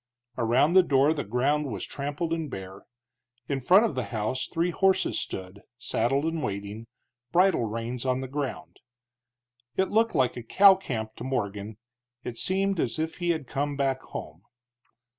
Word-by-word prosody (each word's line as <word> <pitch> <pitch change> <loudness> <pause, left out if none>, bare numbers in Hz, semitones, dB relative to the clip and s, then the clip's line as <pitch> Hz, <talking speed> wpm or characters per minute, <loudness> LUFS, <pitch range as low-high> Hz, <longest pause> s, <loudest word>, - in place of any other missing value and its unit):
Around 125 +7 +3
the 190 - +8
door 145 -2 +3
the 145 -3 -3
ground 140 +7 0
was 100 -4 -4
trampled 145 +4 -3
and 160 -3 -3
bare; 95 -2 -8 0.6
in 140 -1 -1
front 185 - +5
of 200 - -1
the 125 -2 -2
house 115 +4 -2
three 170 +1 0
horses 190 +1 +2
stood, 95 +2 -6 0.2
saddled 125 +4 0
and 165 -1 -1
waiting, 105 0 -5 0.4
bridle 180 -7 +3
reins 115 +2 -4
on 130 -1 0
the 130 - -4
ground. 130 - -5 1.0
It 190 - +1
looked 225 -2 +2
like 130 -4 +2
a 120 - -5
cow 195 - +7
camp 115 -13 -4
to - - -7
Morgan; 105 -5 -3 0.5
it 120 - -5
seemed 195 0 +1
as 115 -6 0
if 160 +1 -3
he 175 -1 -2
had 160 -4 0
come 145 +2 -2
back 135 -2 0
home. 80 +3 -8
135 Hz, 165 wpm, -27 LUFS, 115-165 Hz, 1.0 s, the